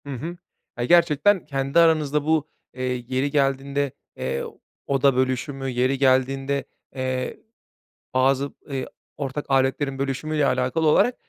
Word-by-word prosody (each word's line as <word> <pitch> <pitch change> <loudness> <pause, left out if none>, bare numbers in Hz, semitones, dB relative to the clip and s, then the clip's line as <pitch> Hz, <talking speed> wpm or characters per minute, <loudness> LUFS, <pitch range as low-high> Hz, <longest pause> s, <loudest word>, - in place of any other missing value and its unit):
Hı - - -9
hı. 165 +8 -6 0.4
Ya 120 - 0
gerçekten 170 +4 +4
kendi 135 +1 0
aranızda 150 -3 +3
bu, 155 -1 +2 0.3
eee, 130 - -6 0.2
yeri 130 +2 0
geldiğinde, 140 0 0 0.3
eee, 65 - -2 0.4
oda 135 -1 +3
bölüşümü, 130 +1 -1
yeri 130 +2 +1
geldiğinde, 135 +1 +2 0.3
eee, 130 -1 -3 0.8
bazı, 135 +2 +2 0.2
ııı, 135 -2 -2 0.3
ortak 140 0 -4
aletlerin 135 +1 +1
bölüşümüyle 140 +2 -1
alakalı 130 +6 +1
olarak 210 +10 +4
135 Hz, 120 wpm, -24 LUFS, 130-150 Hz, 0.8 s, gerçekten